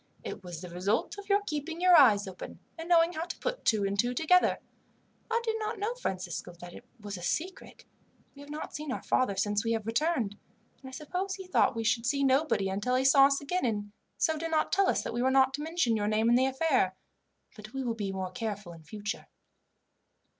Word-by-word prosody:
"It 205 - -7
was 175 -2 -7
the 180 - -8
result 200 - -1
of 405 - -11
your 405 +1 +3
keeping 320 0 -4
your 365 0 +6
eyes 215 -10 +6
open 190 - -8 0.2
and 330 +1 -8
knowing 335 0 +5
how 320 +1 -3
to 355 - -7
put - - -4
two 215 -2 +2
and 200 0 -1
two 245 +3 +1
together. 360 +6 +3 0.7
I 460 0 +2
did 445 -1 -1
not 435 +1 -3
know, 420 +4 -2
Francisco, 185 - -5
that 175 0 -10
it 245 - -12
was 205 -2 -6
a - - -10
secret. 345 - -4 0.5
We 280 - -14
have 285 - -12
not 300 +1 -6
seen 300 -2 -5
our - - -4
father 255 -6 +1
since 205 +1 0
we 230 0 0
have 220 -2 -2
returned, 230 -4 0 0.4
and 265 - -10
I - - -12
suppose 360 +8 -4
he 380 - -9
thought 365 - +2
we 225 - -2
should 230 +1 +1
see 280 +1 +1
nobody 270 -6 +2
until 205 +6 -1
he 260 +1 +1
saw 275 0 +7
us 275 0 0
again, 360 +6 -2
and 205 -4 -2 0.3
so 320 -2 +1
did 330 +1 -3
not 315 -1 +1
tell 390 0 +3
us - - +1
that - - -4
we 240 - -1
were 260 - +3
not 265 0 +4
to 295 - -4
mention 310 -7 0
your 205 -1 -1
name 215 +2 +2
in 240 - +5
the 260 +2 +4
affair; 265 - +1 0.6
but 215 -1 -11
we 270 0 -4
will 240 -2 -1
be 205 -3 -3 0.2
careful 205 -4 -5
in 165 -1 -14
future." 205 +6 -6
260 Hz, 225 wpm, -29 LUFS, 205-325 Hz, 0.7 s, saw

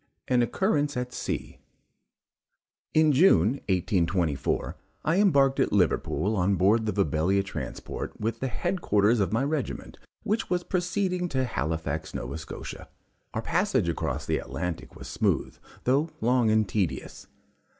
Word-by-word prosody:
AN 125 -1 +3
OCCURRENCE 145 - +1
AT 125 0 -3
SEA. - - -4 1.4
In 155 -1 +5
June, 135 - +4
1824, 85 -5 0 0.3
I 165 +5 +3
embarked 140 -9 +4
at - - +2
Liverpool 105 +3 +1
on 95 +1 +2
board 105 +5 +3
the - - +2
Vibelia 95 +1 +1
transport 100 - -6
with 115 +2 -2
the 135 - -1
head 175 +8 -2
quarters 105 +3 +3
of 100 - +1
my 115 +4 +1
regiment, 145 -2 -3 0.2
which 215 +3 -1
was 180 -1 0
proceeding 180 0 -1
to 130 -3 0
Halifax, 80 - -3
Nova 70 +6 -4
Scotia. 80 - -8 0.5
Our 110 - -2
passage 135 - +1
across 85 - -2
the - - 0
Atlantic 90 -1 -5
was - - -9
smooth, - - 0 0.3
though 140 +6 +2
long 120 0 +3
and 110 -1 +3
tedious. 95 -6 -3
115 Hz, 140 wpm, -27 LUFS, 95-150 Hz, 1.4 s, In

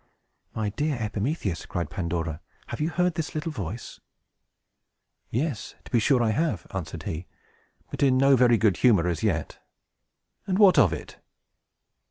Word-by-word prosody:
"My 110 -2 -1
dear 145 +6 -1
Epimetheus," 105 - -2
cried 85 -3 -3
Pandora, 85 -4 -3 0.3
"have - - -5
you 155 - +1
heard 180 0 +1
this 160 -2 -4
little 155 +2 -2
voice?" 105 - -6 1.3
"Yes, 130 -1 -3
to - - -13
be 120 - +4
sure 125 +2 +3
I 110 - +2
have," 115 - -1
answered 85 -3 -5
he, 80 +3 -5 0.6
but - - -5
in 135 -2 +4
no 135 +1 +5
very 120 -2 +5
good 105 -5 +2
humor 100 -9 +4
as 85 -3 -1
yet. - - -1 0.9
"And 185 -1 +1
what 200 -3 +6
of - - +5
it?" - - -7
115 Hz, 155 wpm, -26 LUFS, 90-150 Hz, 1.3 s, what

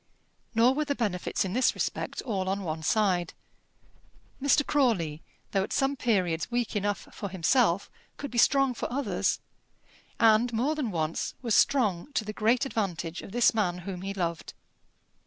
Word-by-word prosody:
Nor 235 +3 +5
were 300 +2 -1
the 285 -1 -1
benefits 200 -6 -1
in 185 - -3
this 255 +3 +2
respect - - -3
all 190 -6 -2
on 195 +1 -2
one 160 -2 -3
side. 180 -1 +1 1.1
Mr. 285 +1 +3
Crawley, 190 - +1 0.3
though 195 - +2
at 195 - -4
some 270 +1 +1
periods 185 -10 0
weak 240 -2 -1
enough 205 0 -1
for 200 - -5
himself, 190 +1 +2 0.3
could 285 - -6
be 240 - 0
strong 275 +1 +4
for 240 - -5
others; 275 +3 0 0.8
and, 230 +1 +5
more 255 +7 +1
than 295 -7 -2
once, 160 -3 -2
was 230 -3 0
strong 220 -3 +2
to 220 - 0
the 215 - -5
great 230 +5 +2
advantage 180 -8 -3
of - - -10
this 240 +2 +4
man 190 -6 0
whom 185 -3 -5
he 195 +1 -4
loved. 170 -4 -3
215 Hz, 165 wpm, -28 LUFS, 180-250 Hz, 1.1 s, Nor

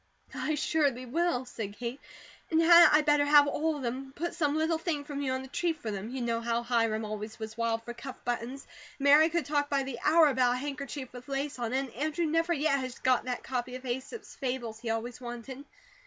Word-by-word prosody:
"I 310 - -1
surely 285 -4 0
will," 310 0 0
said 210 -4 -6
Kate. 245 +3 -5 0.5
"And 320 - +2
hadn't 340 0 +8
I 300 - +6
better 295 -1 +3
have 290 0 +7
ALL 315 +2 0
of 285 - -6
them, 240 +1 -1
and 270 0 -10
put 345 +2 -3
some 300 -4 0
little 320 +1 +1
thing 320 -4 -2
from 285 -1 -5
you 270 -2 -1
on 260 0 -3
the - - -9
tree 335 +5 0
for 265 -9 -6
them? 200 +2 -5
You 260 +1 -4
know 230 -1 -1
how 235 0 -1
Hiram 230 -2 +1
always 215 +1 -6
was 220 -1 -7
wild 230 0 -1
for 240 - -6
cuff 260 +2 -8
buttons, 245 +3 -3 0.3
and - - -14
Mary 300 +3 +7
could 340 0 -1
talk 290 -1 0
by 275 -1 +1
the 265 -3 -6
hour 320 +2 +6
about 250 -2 +2
a - - -2
handkerchief 280 -1 -5
with 250 0 -10
lace 275 0 -3
on 235 -2 -2
it, 260 - +1
and 265 -3 -7
Andrew 310 +6 -1
never 330 +2 +1
yet 295 -3 +2
has 255 -1 -5
got 255 -1 +2
that 250 -1 -3
copy 250 -1 -3
of 255 +1 -9
'Aesop's 260 - -5
Fables,' 245 -4 -4
he 230 -1 -5
always 225 +2 -3
wanted. 245 +3 -7
265 Hz, 235 wpm, -30 LUFS, 240-295 Hz, 0.5 s, hadn't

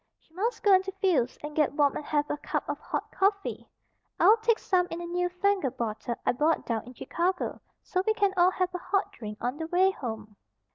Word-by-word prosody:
"She 320 - -33
must 435 +7 -2
go 405 -3 +6
into 380 +1 +3
Phil's 350 -11 +1
and 300 0 -6
get 300 -3 +2
warm 290 -1 +2
and - - -4
have 295 -1 0
a 295 - -2
cup - - -3
of - - -3
hot - - -4
coffee. 395 +1 0 0.5
I'll 440 - +7
take 450 0 +2
some 360 -2 +1
in 335 - -5
a 345 - -5
new 355 +1 -1
fangled 370 -6 0
bottle 230 +1 -3
I - - +4
bought 300 +6 +1
down 230 -2 -2
in 250 +1 -12
Chicago, 360 +8 -2 0.2
so 365 - 0
we 435 - +3
can 400 -3 +2
all 355 0 +5
have 365 -1 -1
a 360 - -3
hot 395 +3 0
drink 210 -2 -8
on 250 +4 -2
the 320 0 -4
way 370 +3 +3
home." 220 - -7
350 Hz, 225 wpm, -28 LUFS, 270-385 Hz, 0.5 s, I'll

